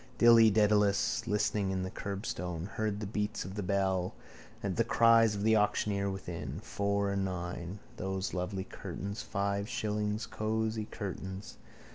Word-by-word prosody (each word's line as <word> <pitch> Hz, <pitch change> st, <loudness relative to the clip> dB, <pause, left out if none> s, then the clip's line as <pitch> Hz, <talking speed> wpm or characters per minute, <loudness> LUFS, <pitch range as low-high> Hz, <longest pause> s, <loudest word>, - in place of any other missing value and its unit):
Dilly 115 Hz, -1 st, +8 dB
Dedalus, 105 Hz, +3 st, +3 dB
loitering 105 Hz, -2 st, +1 dB
by 95 Hz, -, -1 dB
the 95 Hz, -, -4 dB
curbstone, 90 Hz, -4 st, -4 dB
heard 105 Hz, -2 st, -2 dB
the -, -, -2 dB
beats 105 Hz, 0 st, -2 dB
of 95 Hz, -, -6 dB
the 105 Hz, -, -3 dB
bell, 95 Hz, -1 st, 0 dB, 0.5 s
the 100 Hz, +3 st, +1 dB
cries 115 Hz, -2 st, +5 dB
of 100 Hz, -, -3 dB
the 110 Hz, +1 st, +5 dB
auctioneer 105 Hz, -1 st, +1 dB
within. 85 Hz, -6 st, -5 dB
Four 100 Hz, -2 st, 0 dB
and 100 Hz, 0 st, 0 dB
nine. 90 Hz, 0 st, -4 dB, 0.2 s
Those 95 Hz, 0 st, -2 dB
lovely 95 Hz, +1 st, -2 dB
curtains. 100 Hz, +2 st, -6 dB
Five 100 Hz, +1 st, -1 dB
shillings. 105 Hz, -2 st, -1 dB
Cosy 110 Hz, 0 st, -1 dB
curtains. 95 Hz, -1 st, -6 dB
100 Hz, 140 wpm, -32 LUFS, 95-110 Hz, 0.5 s, Dilly